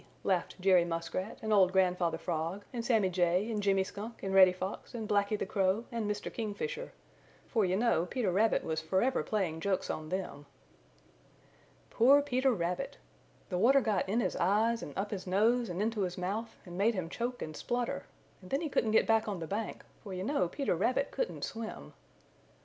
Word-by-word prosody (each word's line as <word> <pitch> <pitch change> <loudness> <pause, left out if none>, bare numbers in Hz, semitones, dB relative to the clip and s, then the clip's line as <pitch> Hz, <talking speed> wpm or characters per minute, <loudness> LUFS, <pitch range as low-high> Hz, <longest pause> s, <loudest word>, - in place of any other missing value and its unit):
laughed 190 0 -1
Jerry 185 -2 +5
Muskrat 170 +4 -3
and 220 0 +1
old 190 -3 +5
Grandfather 180 -3 +2
Frog 170 +4 -3
and 235 -2 -3
Sammy 220 -6 +2
Jay 180 +4 +1
and 210 -2 -1
Jimmy 195 -1 +3
Skunk 210 +4 -8
and 195 0 -2
Reddy 190 -1 +8
Fox 185 +5 -6
and 220 -2 -4
Blacky 205 0 +1
the - - -2
Crow 195 +2 +1
and 230 -3 -2
Mr. 210 0 -3
Kingfisher, 455 - -4 0.6
for 220 -4 +2
you 185 0 +1
know 205 -5 +2
Peter 230 -6 -1
Rabbit 215 +5 +2
was 160 0 -2
forever 190 +11 +1
playing 185 -7 -1
jokes 190 +2 -1
on 155 0 -5
them. 180 -6 -4 1.4
Poor 275 +5 +6
Peter 265 -1 +2
Rabbit! 180 -4 -2 0.5
The 180 -3 -1
water 265 +7 +6
got 210 -7 0
in 225 +4 +2
his - - -1
eyes 220 +5 +2
and 145 - -8
up 200 +2 -2
his 190 -3 -5
nose 225 +5 +2
and 180 +3 -2
into 220 -1 -1
his 180 -2 -2
mouth 200 +6 -3
and 175 -1 -9
made 210 +5 +2
him 185 -3 -2
choke 240 +7 -3
and 155 -1 -7
splutter, 245 +5 -2 0.3
and 185 - -13
then 275 - 0
he 320 - -2
couldn't 225 -5 +1
get - - +4
back 225 0 +2
on 205 -3 -2
the 165 - -5
bank, 205 +6 -4 0.2
for 195 -3 -6
you 185 - -3
know 225 -5 +1
Peter 275 - -1
Rabbit - - 0
couldn't - - -3
swim. 215 - -6
200 Hz, 195 wpm, -32 LUFS, 180-230 Hz, 1.4 s, Reddy